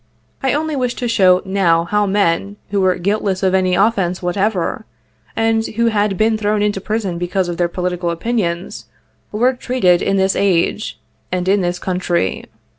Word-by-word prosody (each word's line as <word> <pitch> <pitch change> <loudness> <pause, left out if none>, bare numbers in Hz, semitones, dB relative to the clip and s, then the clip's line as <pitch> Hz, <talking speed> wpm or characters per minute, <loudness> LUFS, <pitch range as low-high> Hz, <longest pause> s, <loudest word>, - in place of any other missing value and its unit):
I 265 -2 +1
only 310 +1 -1
wish 250 -3 -1
to 245 - -3
show 185 -5 +4
now 185 -4 +2
how 210 +4 0
men, 200 0 0
who 200 -1 +1
were 185 -1 +3
guiltless 195 0 -1
of 190 -1 +2
any 185 -1 +2
offence 190 -3 +1
whatever, 195 +5 -1 0.5
and 225 0 +1
who 230 +1 0
had 205 -2 +1
been 220 +1 +2
thrown 210 0 +1
into 205 -2 -1
prison 200 -5 -2
because 180 +1 -1
of 175 -1 -4
their 175 - +1
political 180 0 -2
opinions, 170 - -2 0.5
were 245 +5 +2
treated 245 -9 +1
in 195 - +1
this 190 0 +2
age, 190 - 0 0.3
and 180 0 -2
in 195 +1 +3
this 175 0 -1
country. 180 - -1
195 Hz, 170 wpm, -18 LUFS, 180-215 Hz, 0.5 s, show